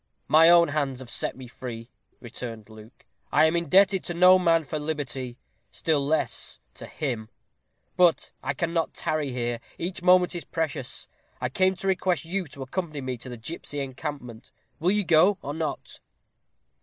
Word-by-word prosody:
"My 160 +2 +7
own 170 -1 +6
hands 140 -3 -1
have 125 -3 -9
set - - -2
me 130 -1 -9
free," 120 -1 -8 0.3
returned 115 -2 -8
Luke. 110 +2 -15 0.3
"I - - +5
am 160 +2 +2
indebted 190 +3 +4
to 175 - -4
no 185 +2 +7
man 165 -2 +3
for 150 +2 -4
liberty; 135 -5 -4 0.3
still 155 -3 0
less 155 +3 -1 0.2
to - - -10
him. 120 -7 -4 0.7
But 175 -3 +3
I 140 +2 -2
cannot 165 +2 -1
tarry 155 -3 -1
here; 120 -1 -2 0.2
each 180 +1 -4
moment 180 0 +5
is 175 - -5
precious. 155 -6 -4 0.3
I 125 - -2
came 185 +7 +2
to 195 - -5
request 185 -4 +1
you 185 +1 -2
to 140 -1 -8
accompany 155 +1 -4
me 130 -1 -3
to 130 - -9
the 120 - -7
gipsy 145 +4 -6
encampment. 130 -3 -6 0.3
Will 175 - +2
you 205 +1 +2
go, 180 +4 +5
or 145 - -4
not?" 155 -2 -5
155 Hz, 170 wpm, -26 LUFS, 130-175 Hz, 0.7 s, My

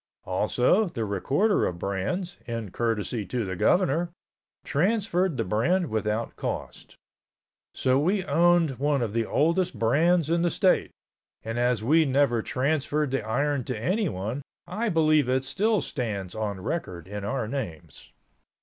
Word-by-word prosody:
Also 120 - +2
the 120 - -3
recorder 135 - +1
of 85 - -4
brands, 110 - -3
in 115 -5 -4
courtesy 115 0 -1
to 115 +4 -3
the 95 -1 -4
governor, 170 - +2 0.6
transferred 185 - +1
the - - +1
brand 150 - +1
without 110 +1 -1
cost. - - -6 0.8
So 130 +1 +2
we 185 +6 +1
owned 170 -7 +3
one 140 -2 +1
of 110 -3 -3
the 115 -1 0
oldest 170 +5 +1
brands 160 +8 +3
in 170 +1 +1
the 175 - +2
state, 185 +2 +2 0.5
and 115 +2 -3
as 120 -3 +1
we 155 +6 +4
never 135 -4 +2
transferred 145 +2 0
the 135 -4 -1
iron 140 +5 0
to 125 - -3
anyone 135 - -1 0.2
I 230 +1 -2
believe 155 -6 +3
it 130 +1 +1
still 210 +8 +1
stands 105 -9 -4
on 105 -3 -3
record 90 - -4
in 105 +1 -6
our 110 +2 -2
names. 85 - -6
135 Hz, 145 wpm, -26 LUFS, 110-170 Hz, 0.8 s, we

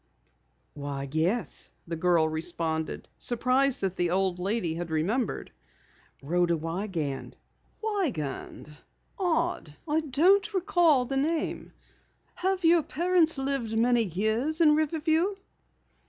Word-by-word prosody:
"Why, 140 -1 -5
yes," 175 +10 -1 0.2
the 165 - -3
girl 165 -1 +3
responded, 160 0 -3
surprised 255 +2 +1
that 190 -1 -2
the 175 -1 +1
old 185 0 0
lady 190 -3 -1
had 170 +1 -5
remembered. 195 +10 -1 0.7
"Rhoda 170 +3 +1
Wiegand." 165 -3 -4 0.5
"Wiegand 230 - -3 0.4
odd, 340 - -1
I 305 +1 +2
don't 370 +9 +3
recall 345 -8 +3
the 270 +2 -2
name. 310 +3 -1 0.6
Have 375 -1 -1
your 335 0 +6
parents 335 +1 +2
lived 265 -5 -2
many 240 +1 +3
years 220 - -1
in 310 -3 +6
Riverview?" 315 +5 +1
235 Hz, 110 wpm, -28 LUFS, -, 0.7 s, your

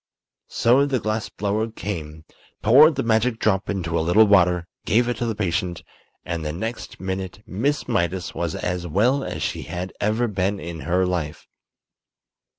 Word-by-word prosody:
So 130 +5 +3
the 135 -3 0
glass 110 0 -2
blower 105 +3 -1
came, 80 -8 -6 0.4
poured 145 +8 +7
the 135 - -1
magic 115 +1 +2
drop 100 -3 0
into 85 -4 -1
a - - +1
little 90 +7 +5
water, 90 -4 +4 0.2
gave 120 +3 +2
it 120 -2 -1
to 120 - -2
the 115 - -2
patient, 90 -3 -2 0.4
and 85 -1 -3
the 75 - -2
next 110 +9 -5
minute 95 +1 -5
Miss 140 +10 -1
Mydas 95 -5 -1
was 85 -1 -2
as 90 0 -3
well 120 - +2
as - - -4
she - - -2
had 90 +1 -5
ever 110 +3 +1
been 100 -1 -1
in 85 -2 -6
her 90 +2 +3
life. 85 -5 -3
100 Hz, 165 wpm, -23 LUFS, 90-115 Hz, 0.4 s, poured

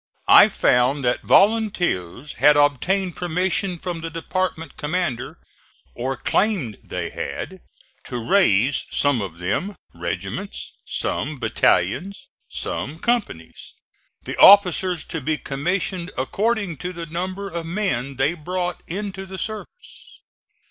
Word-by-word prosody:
I - - +9
found 125 +3 +2
that 120 - +1
volunteers 175 - +2
had 150 0 +6
obtained 175 +6 +2
permission 180 +2 -1
from 170 -1 -5
the 165 - -4
department 165 0 -3
commander, 150 -6 -2 0.6
or 130 - -3
claimed 170 - 0
they - - -4
had, 180 - -6 0.4
to 125 - -4
raise, 125 - +3
some 145 -5 +1
of 90 -4 -6
them, 105 - -2 0.2
regiments; 95 - -5
some 150 +1 -2
battalions; 115 - 0 0.2
some 150 +4 -4
companies 210 - -3 0.5
the - - -5
officers 185 -3 +6
to 165 -3 -5
be 155 +3 0
commissioned 175 +6 -2
according 200 - -1
to 180 +4 -5
the 170 -1 -6
number 185 +5 -4
of 170 -3 -5
men 165 - -2
they 135 +5 +1
brought 180 +2 -3
into 195 +1 -5
the 190 0 -7
service. 215 - -8
170 Hz, 120 wpm, -22 LUFS, 135-190 Hz, 0.6 s, I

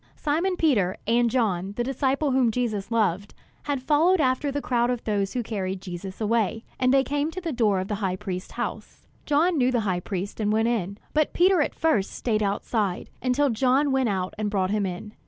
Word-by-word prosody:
Simon 335 +6 0
Peter, 220 - +2
and 235 +2 +3
John, 200 -6 0
the 240 - -1
disciple 270 +3 0
whom 255 -2 +3
Jesus 220 -4 -2
loved, 205 -4 0 0.3
had 280 -3 -2
followed 320 +6 +3
after 270 0 +1
the 285 - -2
crowd 240 -3 +1
of 245 -2 -2
those 200 -2 -1
who 245 - -1
carried 195 -4 -3
Jesus 185 +1 -7
away; 225 0 0 0.2
and 255 -1 +3
they 270 0 +4
came 290 +2 -1
to 360 - -6
the 340 -3 -3
door 215 -7 +2
of 185 - -3
the 210 - -3
high 185 -2 0
priest's 185 -1 -6
house. - - -6 0.2
John 310 +3 +3
knew 250 0 +3
the 240 -2 +1
high 185 -4 0
priest 190 +3 -5
and 210 -1 +1
went 225 +2 +2
in; 200 -4 -2 0.2
but 305 -1 +1
Peter 360 -1 +4
at - - -1
first 305 -12 +1
stayed 215 -3 -1
outside, 200 -1 -1
until 260 +2 +2
John 265 +5 +2
went 265 -3 +2
out 185 -2 -2
and 210 -1 0
brought 190 -2 0
him 205 -2 +1
in. 185 +4 -7
230 Hz, 210 wpm, -25 LUFS, 200-275 Hz, 0.3 s, they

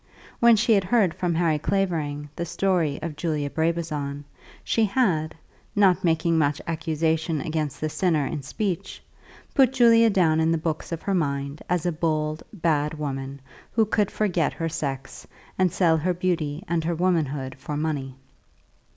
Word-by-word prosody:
When 235 -1 +7
she 225 +1 +3
had 200 -2 +3
heard 195 -4 +3
from 175 -2 -1
Harry 160 -2 +2
Clavering 155 -6 -1
the 170 - -3
story 170 -4 0
of 160 -2 -4
Julia 150 -3 -2
Brabazon, 155 -4 -2 0.4
she 225 - +2
had, 185 -8 +1 0.4
not 190 -2 +4
making 165 -1 +2
much 145 0 +1
accusation 160 0 -1
against 155 0 -3
the 155 - -1
sinner 155 -1 +1
in 150 +1 -3
speech, 175 +6 -4 0.5
put 265 -3 +5
Julia 230 -3 +6
down 170 -6 +3
in 160 0 +2
the 165 - +2
books 160 0 -3
of 165 - -4
her 200 - -1
mind 140 -3 -1
as 180 -1 0
a 175 - +2
bold, 155 -1 -1
bad 155 -6 0
woman 135 -2 -5 0.3
who 225 -1 +3
could 210 -1 +1
forget 180 -7 0
her 165 0 -3
sex, 135 -3 -5 0.3
and 185 -2 +3
sell 165 -3 +3
her 180 +3 0
beauty 170 -3 -1
and 170 -1 0
her 170 +1 -1
womanhood 150 -7 0
for 150 +2 -4
money. 145 -4 -2
160 Hz, 160 wpm, -25 LUFS, 150-180 Hz, 0.5 s, When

